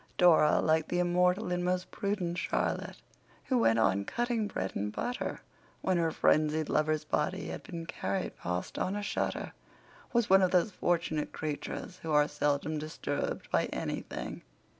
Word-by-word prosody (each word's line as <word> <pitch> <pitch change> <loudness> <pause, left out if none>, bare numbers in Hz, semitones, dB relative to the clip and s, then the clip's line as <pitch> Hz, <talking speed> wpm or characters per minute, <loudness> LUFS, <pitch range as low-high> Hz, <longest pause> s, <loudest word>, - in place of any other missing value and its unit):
Dora, 165 -4 +6
like 160 0 +2
the 175 - -1
immortal 180 +2 +2
and 180 0 0
most 180 +1 -1
prudent 185 -4 -2
Charlotte, - - -1 0.5
who 255 -2 +2
"went 115 - +4
on 100 -3 +3
cutting 235 - -1
bread 95 - -3
and 105 +1 -2
butter" 245 - -3 0.4
when 185 -1 +2
her 165 -1 +2
frenzied 155 0 +2
lover's 155 0 +1
body 185 +6 -1
had - - -5
been 170 -2 -7
carried 100 -10 -3
past 90 +1 -4
on 190 - 0
a 205 - -3
shutter, - - -2 0.6
was 235 -3 +2
one 195 +1 +6
of 185 - +4
those 180 +3 +3
fortunate 165 -4 0
creatures 155 +4 -5
who 160 - -4
are 150 0 +5
seldom 145 +2 0
disturbed 150 -2 -3
by - - +3
anything. - - -4
170 Hz, 160 wpm, -31 LUFS, 150-185 Hz, 0.6 s, Dora